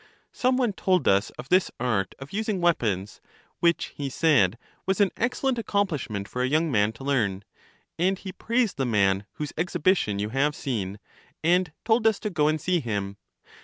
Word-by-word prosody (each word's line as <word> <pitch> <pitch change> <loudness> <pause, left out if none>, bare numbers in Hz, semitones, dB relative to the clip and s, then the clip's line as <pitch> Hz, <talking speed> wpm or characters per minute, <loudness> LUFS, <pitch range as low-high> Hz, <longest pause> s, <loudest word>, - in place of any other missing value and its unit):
Some 255 0 +1
one 245 -5 +1
told 185 -5 +1
us 100 +2 +3
of 130 - -9
this 185 +1 +4
art 110 -6 -1
of 135 +5 -11
using 215 -2 -1
weapons, 105 - 0 0.4
which, 170 -1 +1
he 140 -1 -3
said, 125 - +3 0.3
was 190 -1 +1
an 200 -2 +4
excellent 250 +1 0
accomplish 200 - -1
ment 100 -2 -4
for 125 - -4
a 125 - +2
young 155 +3 +1
man 105 -2 +3
to 115 - -12
learn; 105 -9 0 0.6
and 190 +2 +2
he 190 0 -7
praised 230 +3 0
the 135 - 0
man 100 -2 +2
whose 150 -1 -5
exhibition 175 - +1
you 105 +1 -2
have 140 +5 +1
seen, 105 -7 -3 0.5
and 175 0 +3
told 225 0 +3
us 220 -2 +3
to 210 - -3
go 150 -4 +2
and 155 0 +1
see 180 +3 +1
him. 100 -6 -3
150 Hz, 185 wpm, -26 LUFS, -, 0.6 s, this